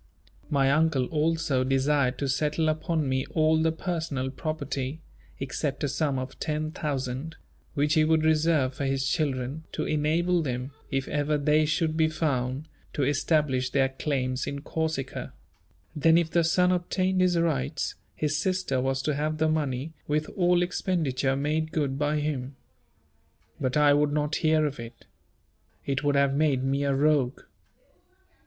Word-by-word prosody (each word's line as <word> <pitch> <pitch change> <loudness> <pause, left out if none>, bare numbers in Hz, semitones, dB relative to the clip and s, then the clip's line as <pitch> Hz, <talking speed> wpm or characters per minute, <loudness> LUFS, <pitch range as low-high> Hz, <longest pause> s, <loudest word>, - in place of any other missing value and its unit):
My 135 -2 +3
Uncle 150 -3 +2
also 155 -4 +1
desired 135 0 +1
to 140 - -2
settle 150 +4 +1
upon 155 -1 -1
me 130 0 -1
all 160 0 +3
the 160 0 +2
personal 160 -6 -3
property, 145 -1 -4 0.4
except 135 +1 -3
a - - +2
sum 140 0 0
of 130 0 -6
10,000*l.*, 150 -2 -3 0.4
which 150 +1 +2
he 155 -2 +4
would 160 0 +3
reserve 155 -4 +2
for 140 +1 -3
his 135 0 0
children, 140 -2 -1
to - - -2
enable 165 +4 +1
them, 130 -2 -3 0.2
if 135 -1 -1
ever 150 0 0
they 150 +1 +3
should 155 0 0
be 160 -1 +4
found, 140 -3 -1 0.3
to 145 - 0
establish 145 -2 +1
their 135 0 +2
claims 130 -1 -2
in 140 0 -4
Corsica: 155 -4 -3 0.6
then 160 +2 +4
if 165 -1 +1
the 170 - +3
son 180 +2 +3
obtained 185 +1 0
his 180 -1 +3
rights, 165 - 0 0.2
his 150 0 -1
sister 180 -5 0
was 135 0 -1
to 150 - 0
have 155 +2 -1
the 160 0 +2
money 150 -1 -1
with 150 +1 0
all 175 -1 +2
expenditure 155 -8 0
made 155 +3 -1
good 140 -4 -1
by 150 +1 +1
him. 140 -3 -3 1.0
But 130 +2 0
I 145 -1 +6
would 145 0 +2
not 150 0 0
hear 155 -1 +3
of 140 -4 -3
it. 115 0 -10 0.8
It 135 0 -1
would 145 0 +2
have 140 -1 +3
made 140 -3 +2
me 135 +1 0
a 140 - +2
rogue. 140 -3 +2
150 Hz, 155 wpm, -27 LUFS, 135-160 Hz, 1.0 s, I